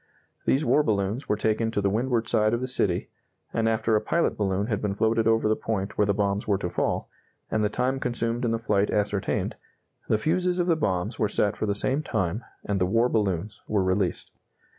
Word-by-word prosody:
These 140 +4 +2
war 150 - +4
balloons 105 0 -1
were - - +3
taken 110 +1 0
to 110 - -1
the 100 -1 +1
windward 115 +1 0
side 110 -1 +2
of - - -2
the 130 - -3
city, 100 -8 0 0.4
and 115 0 +1
after 110 0 +1
a 105 - +2
pilot 170 - +1
balloon 100 -1 0
had 105 -3 -2
been 100 -2 -1
floated 110 +1 +2
over 115 -1 +3
the 110 - +3
point 100 -3 -3
where 105 - +2
the 100 - +3
bombs 100 0 0
were 100 -2 +2
to 90 -2 -4
fall, - - -1 0.4
and 110 - +1
the 105 - +2
time 125 +4 0
consumed 120 -1 -1
in 120 - +1
the 115 - +1
flight 105 -3 +1
ascertained, 105 -1 -1 0.5
the 110 - +4
fuses 180 +8 0
of 175 - +1
the 170 -2 +3
bombs 95 - -1
were 105 - +2
set 100 -1 +1
for 110 - -2
the 100 - 0
same 130 +7 0
time, 110 - -2 0.2
and 100 -2 -1
the 90 - +3
war 115 +5 +3
balloons 100 -3 -1
were 105 -3 +1
released. 95 -1 -1
110 Hz, 220 wpm, -26 LUFS, 100-115 Hz, 0.5 s, war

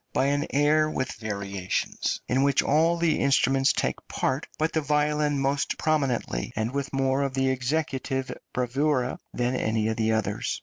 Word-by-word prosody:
by 130 - +2
an 145 +2 +1
air 150 +2 +3
with 130 -4 -2
variations, 100 -3 -3
in 130 +2 +2
which 140 0 +3
all 165 +4 +3
the 170 -2 +1
instruments 135 0 +3
take - - -1
part, 130 +3 -1
but 155 +1 0
the 160 - +1
violin 150 0 +1
more 135 +1 +1 0.2
prominently, 135 - 0
and 110 +2 -1
with 140 -1 -2
more 135 0 +1
of 135 -1 -2
executive 130 0 -1 0.2
bravura 130 +1 0
than 125 +1 -1
any 110 -2 0
of 110 - -2
the 110 0 +1
others. 110 -1 -1
135 Hz, 160 wpm, -26 LUFS, 125-150 Hz, 0.2 s, air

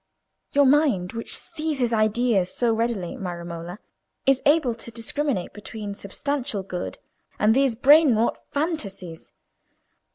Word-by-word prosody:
Your 285 0 +5
mind, 265 - +3
which 230 0 -2
seizes 290 -7 -2
ideas 215 -3 +2
so 235 -2 +1
readily, 225 -6 -2
my 180 -3 -5
Romola, 170 +1 -7 0.5
is 270 -1 +3
able 290 -5 +3
to 230 +1 -8
discriminate 235 -2 -2
between 210 0 -7
substantial 245 +2 -3
good 180 -2 -5 0.4
and 215 +1 +4
these 270 -3 +3
brain 280 +1 +6
wrought 225 +2 0
fantasies. 200 - -4
230 Hz, 125 wpm, -24 LUFS, 195-275 Hz, 0.5 s, brain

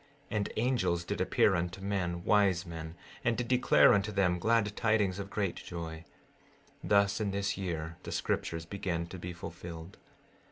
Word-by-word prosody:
16:14 105 - 0
And 100 - -1
angels 115 -8 +1
did - - -3
appear - - +3
unto 85 +1 -2
men, 90 -3 -2
wise 100 -3 +3
men, 80 -1 -7 0.3
and 120 -1 +1
did 120 - -2
declare 125 0 +5
unto 100 +1 +1
them 90 -3 +2
glad 110 0 +2
tidings 105 -4 +1
of 100 0 -5
great 100 -4 -1
joy; 80 -1 -7 0.8
thus 100 +1 +3
in 105 - 0
this 100 +1 -1
year 85 -4 -4
the - - -7
scriptures 85 0 -2
began 85 -2 -3
to 90 +2 -9
be 90 +1 -5
fulfilled. 85 0 -8
95 Hz, 165 wpm, -31 LUFS, 85-100 Hz, 0.8 s, declare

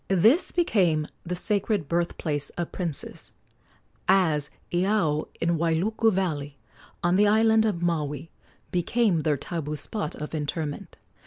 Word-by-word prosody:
This 220 - +4
became 180 - +2 0.2
the 180 +1 -3
sacred 205 -2 0
birth 170 +2 -1
place 145 -3 -1
of 175 -1 -3
princes, 170 -6 -4 0.7
as 160 -6 +3 0.2
Iao, 175 -4 +1
in 170 -1 +1
Wailuku 185 +8 +2
valley, 150 -7 -2 0.5
on 175 +1 +3
the 205 +1 +5
island 220 +1 +4
of 175 -5 -2
Maui, 155 -3 -2 0.4
became 180 0 +2
their 150 -1 +1
tabu 150 0 -4
spot 155 +3 -3
of 150 +1 -7
interment. 150 -1 -4
170 Hz, 130 wpm, -26 LUFS, 150-200 Hz, 0.7 s, the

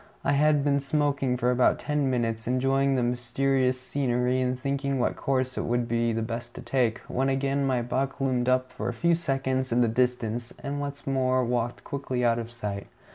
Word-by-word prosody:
I - - +2
had 145 0 +3
been 140 -1 +2
smoking 140 -2 0
for 125 0 +2
about 125 0 +3
ten 150 -2 0
minutes, 115 -3 -1
enjoying 135 +2 +2
the 125 - +1
mysterious 125 +2 +1
scenery 125 -1 0
and 125 0 -1
thinking 140 0 -1
what 125 - 0
course 130 -1 -1
it - - -2
would 120 0 0
be 115 0 +1
best 115 +2 -4
to - - -7
take, 120 -4 +1
when 135 +2 0
again 135 +1 0
my 125 -2 +1
buck 135 +3 -2
loomed 130 -2 +1
up 130 0 +1
for - - -3
a - - -3
few 170 +7 +2
seconds 135 -5 -1
in 120 +1 +3
the 120 - +4
distance, 120 0 -1
and 140 +1 -3
once 140 0 -6
more 130 -1 +1
walked 120 0 -2
quickly 130 -3 -2
out 115 0 +3
of 115 0 -6
sight. 105 -4 -5
130 Hz, 195 wpm, -27 LUFS, 120-135 Hz, -, the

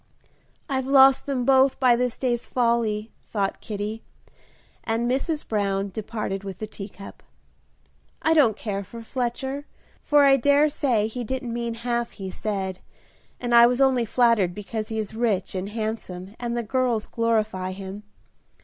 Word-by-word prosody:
"I've 265 -2 -1
lost 270 0 +6
them 260 -3 -1
both 265 0 +4
by 250 -2 +5
this 250 0 -1
day's 240 -2 -1
folly," 230 -3 0 0.2
thought 200 -3 -2
Kitty, 210 +1 -4 0.8
as 225 0 -1
Mrs. 270 +6 -1
Brown 200 -2 0
departed 210 -1 -4
with 195 -2 -6
the 215 - -4
teacup. 200 -1 -10 1.0
"I 320 - +4
don't 250 -10 +4
care 200 -2 -3
for 230 +4 -10
Fletcher, 265 +4 -3 0.3
for 290 -1 +4
I 275 -1 +6
dare 285 +3 +4
say 255 -8 +1
he 240 +3 -4
didn't 245 0 -4
mean 235 -1 -3
half 235 0 -2
he 190 -1 -6
said, 190 -3 -3 0.6
and 240 -1 -2
I 235 0 +9
was 245 +1 0
only 260 -3 +3
flattered 230 -6 +2
because 215 +1 -4
he 220 - -4
is 215 -1 -3
rich 220 -5 0
and 190 +1 -3
handsome 210 -3 -5
and 240 -1 -2
the 235 - -1
girls 240 -1 0
glorify 215 -5 0
him. 195 +1 -7
230 Hz, 155 wpm, -24 LUFS, 210-255 Hz, 1.0 s, I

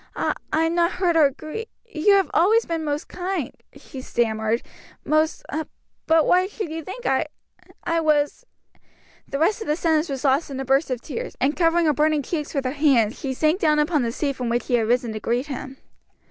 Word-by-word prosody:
"I - - 0 0.2
I'm 325 +1 +1
not 345 0 +2
hurt 360 -2 +1
or 305 -4 +6
gri 310 - -7 0.2
you 405 -2 +2
have 390 -1 +3
always 435 +7 +4
been 330 -1 -3
most 295 0 -3
kind," 360 -6 -3 0.3
she 265 - -10
stammered, 225 -2 0 0.4
"most 310 +1 +1 0.6
But 320 -1 +4
why 365 +1 +3
should 410 -5 -6
you 325 0 -5
think 390 +9 -8
I 270 +4 +1 0.6
I 335 0 0
was 300 -2 +1 0.4
" - - -32
The 275 - -1
rest 395 +9 +1
of - - -5
the 300 - +2
sentence 320 -1 +1
was 270 -1 -4
lost 275 +4 +2
in 270 -1 -5
a 270 - -3
burst 270 +3 +2
of 250 -2 -2
tears, 475 +10 -6
and 285 +3 +1
covering 335 0 +3
her 305 - +3
burning 300 0 +2
cheeks 300 0 -4
with 275 -2 -1
her 255 - 0
hands, 265 -7 +2
she 265 -2 -3
sank 310 +6 +2
down 305 -4 +3
upon 300 0 +2
the 235 -1 -1
seat 280 +2 -2
from 245 -2 -2
which 240 +1 0
she - - -4
had 230 -2 +2
risen 240 -1 +1
to 215 - -4
greet 240 +5 -1
him. 270 -1 -7
300 Hz, 215 wpm, -23 LUFS, 265-335 Hz, 0.6 s, or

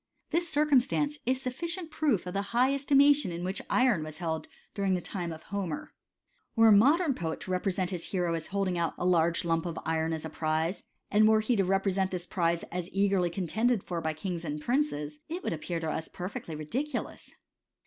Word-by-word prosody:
This 340 +1 +1
circumstance 295 0 +2
is 255 +1 +3
a - - -10
sufficient 335 +6 -4
proof 285 - +1
of 180 - -5
the 200 - 0 0.2
high 260 +3 +4
esti 280 +1 +1
mation 285 -5 +6
in 170 0 -5
which 185 +2 -3
iron 250 -9 +3
was 155 0 -7
held 160 -2 -3 0.3
during 195 -2 +1
the - - 0
time 175 -1 -4
of 160 -1 -8
Homer. 195 -6 -4 0.6
Were 225 -1 +7
a - - +7
modem 280 - +5
poet 160 -8 -3
to 185 - -5
represent 185 0 0
his 175 -3 -4
hero 180 -3 0
as 165 -1 -3
holding 190 -3 -1
out 170 - -1
a - - -2
large 170 -1 +3
lump 165 0 +1
of 165 -1 -5
iron 160 0 0
as 160 -1 -3
a - - -4
prize, 160 +4 -1 0.3
and 215 +1 +5
were 220 0 +5
he 220 +3 +1
to 195 - +3
represent 195 0 +1
this 180 -2 -4
prize 170 -2 0
as 180 0 -4
eagerly 195 -2 +2
contended 200 +6 0
for 170 -2 -3
by 160 -1 -1
kings 170 +2 -4
and 150 -2 -3
princes, 150 - -1
it 350 +3 -4
would - - -1
appear 165 +2 -3
to 160 -1 -2
us 160 - -3
per 180 - -6
fectly 165 -5 -6
ridiculous. 250 - -4
185 Hz, 210 wpm, -29 LUFS, 165-245 Hz, 0.6 s, Were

